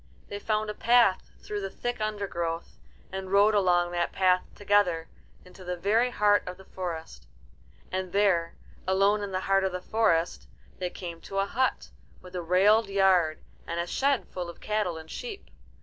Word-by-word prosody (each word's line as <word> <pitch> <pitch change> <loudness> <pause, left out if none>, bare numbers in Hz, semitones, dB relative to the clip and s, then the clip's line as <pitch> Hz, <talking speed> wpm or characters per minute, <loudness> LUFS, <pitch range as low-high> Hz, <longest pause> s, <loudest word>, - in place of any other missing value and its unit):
They 205 - -5
found 215 0 -1
a - - -7
path 235 -4 +3
through 210 -1 -4
the 195 - -3
thick 245 +2 -4
undergrowth, 185 -6 -3 0.3
and 190 0 -5
rode 205 +2 +5
along 175 -3 +3
that 175 -1 -1
path 185 -1 +3
together 200 -5 +2 0.4
into 180 +1 -14
the 180 0 -4
very 220 +7 +2
heart 210 -3 +3
of 180 - -6
the 190 - -15
forest. 165 - -6 0.6
And 185 -1 -3
there, 190 -4 +2 0.3
alone 195 +2 +3
in 200 -1 -4
the 185 0 -1
heart 195 0 +2
of 190 - 0
the 180 - -3
forest, 180 -5 0 0.3
they 180 -1 -2
came 170 -2 -8
to 195 - -7
a 195 - +2
hut, 255 +6 -1 0.3
with 180 0 -13
a 180 - -2
railed 200 +5 +4
yard 185 -5 +3 0.2
and 170 +1 -3
a 170 - 0
shed 275 +8 0
full 180 -2 -5
of 170 - -11
cattle 210 -6 -1
and 160 0 -10
sheep. 455 -5 -7
190 Hz, 180 wpm, -28 LUFS, 175-210 Hz, 0.6 s, rode